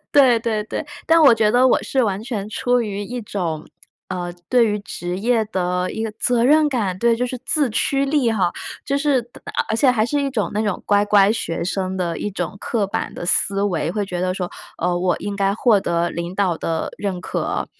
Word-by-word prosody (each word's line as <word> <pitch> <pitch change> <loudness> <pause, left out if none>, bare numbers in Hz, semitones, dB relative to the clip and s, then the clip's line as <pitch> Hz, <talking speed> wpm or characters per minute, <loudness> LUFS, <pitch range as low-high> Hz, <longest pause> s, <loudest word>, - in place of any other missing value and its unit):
对 255 -5 +6
对 220 -2 -1
对， 290 - -5 0.2
但 330 0 +5
我 270 -6 +8
觉 220 -2 +2
得 245 +3 +5
我 - - +3
是 265 -2 0
完 200 -1 -2
全 220 -4 -4
出 245 +3 +1
于 205 -2 -4
一 245 +4 -5
种 170 -7 -3 0.4
呃， 180 -2 -3 0.2
对 245 -2 +5
于 210 0 0
职 180 -2 -5
业 230 +1 +2
的 180 -2 -1
一 220 - -3
个 215 - -4
责 245 -1 +2
任 300 +2 +5
感。 200 -9 -1
对， 235 +1 +3
就 250 +1 0
是 255 0 -5
自 290 -6 +2
驱 275 +5 +1
力 275 -4 +2
哈， 185 -5 +1 0.3
就 280 +1 0
是 285 -2 +2 0.3
而 - - -2
而 220 - +1
且 260 +1 +4
还 220 -3 +2
是 290 +4 0
一 275 -1 -1
种 220 -6 -1
那 210 +2 0
种 205 -4 -1
乖 205 0 +3
乖 205 0 +5
学 170 -6 -3
生 190 0 -2
的 170 -2 -2
一 210 - -3
种 180 +1 -4
刻 210 -4 -1
板 - - -3
的 - - -6
思 195 +2 +2
维， 170 -5 0
会 205 +2 -1
觉 180 -2 -4
得 185 0 0
说， 180 -2 -4 0.3
呃， 175 +1 0
我 180 -1 +1
应 205 0 -4
该 195 0 +1
获 220 -4 +3
得 170 -2 0
领 170 +2 -5
导 185 -4 +1
的 165 -1 -2
认 190 -3 -3
可。 - - -2
205 Hz, 240 characters per minute, -21 LUFS, 185-245 Hz, 0.4 s, 我